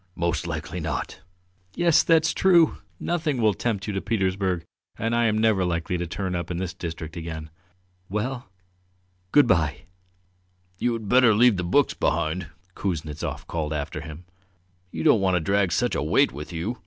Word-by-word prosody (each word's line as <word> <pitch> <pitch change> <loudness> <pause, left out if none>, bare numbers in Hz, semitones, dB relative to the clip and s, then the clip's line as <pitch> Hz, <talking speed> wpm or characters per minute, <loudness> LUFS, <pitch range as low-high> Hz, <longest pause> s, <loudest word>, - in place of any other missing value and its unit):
"Most 85 0 -1
likely 80 +1 -4
not!" 75 -6 -4 0.5
"Yes, 170 -2 +4
that's 160 -1 +3
true! 175 -4 +4 0.2
Nothing 160 -6 -1
will 110 -2 +3
tempt 100 -2 -2
you 105 - -3
to 95 - -2
Petersburg 95 -4 -1 0.3
and 115 +1 -1
I 120 0 +3
am 110 -1 +2
never 110 -3 +3
likely 85 0 -1
to 85 - -3
turn 95 +2 -3
up 85 -1 -3
in 90 - -3
this 95 0 -3
district 80 -3 -6
again. 80 -2 -6 0.6
Well, 120 +3 -3 0.8
good 145 - +6
bye!" 80 - +1 1.0
"You 120 - +1
had 110 -3 -5
better 125 -1 +5
leave 120 -2 +5
the 90 - -2
books 135 +11 +2
behind!" 85 +2 -1 0.3
Kuznetsov 80 -6 -4
called 80 -2 -3
after 75 +1 -4
him. 80 +2 -9 0.6
"You 80 -2 -5
don't 110 - +5
want 95 -1 +2
to - - +3
drag 100 +3 +1
such - - +1
a - - 0
weight - - +3
with 75 +6 -8
you. 90 +9 -4
95 Hz, 170 wpm, -25 LUFS, 80-115 Hz, 1.0 s, good